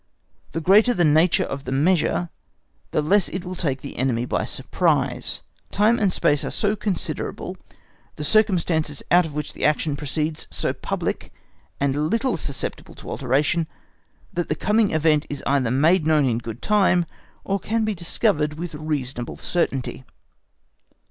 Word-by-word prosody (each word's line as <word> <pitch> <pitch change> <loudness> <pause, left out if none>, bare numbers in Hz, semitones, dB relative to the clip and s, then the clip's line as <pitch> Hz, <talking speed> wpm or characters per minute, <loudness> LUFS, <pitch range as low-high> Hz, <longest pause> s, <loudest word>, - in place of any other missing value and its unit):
The 165 - -2
greater 210 +8 +5
the 175 - +2
nature 160 +3 +4
of 140 +1 -5
the - - -4
measure 170 +4 +2 0.6
the 150 - 0
less 195 +5 +3
it 185 0 -5
will 180 - -5
take 140 -6 -2
the 140 - -8
enemy 125 -2 0
by - - -1
surprise. - - -1 0.3
Time 215 +4 +3
and 200 -4 +2
space 150 -3 +1
are - - -2
so 210 0 0
considerable, 200 -3 -4 0.6
the 150 - -5
circumstances 165 -6 +1
out 175 -1 +5
of 150 - -10
which 150 -1 -4
the - - -7
action 150 0 +2
proceeds 150 +2 -3
so - - -1
public - - -3 0.5
and 140 +2 +1
little 235 +5 +1
susceptible 140 -4 -5
of - - -13
alteration, 145 +5 0 0.7
that 175 -1 -2
the 155 - +1
coming 210 +5 +2
event 155 -1 +2
is 145 - -5
either 135 -4 +2
made 155 +6 +3
known 155 -3 +4
in 120 -3 +1
good 115 -1 -8
time, 195 -4 +3 0.4
or 195 0 -1
can 220 +4 0
be 215 - 0
discovered 165 -4 0
with 165 +1 -6
reasonable 140 -5 -3
certainty. 135 -7 -2
155 Hz, 155 wpm, -23 LUFS, 140-185 Hz, 0.7 s, greater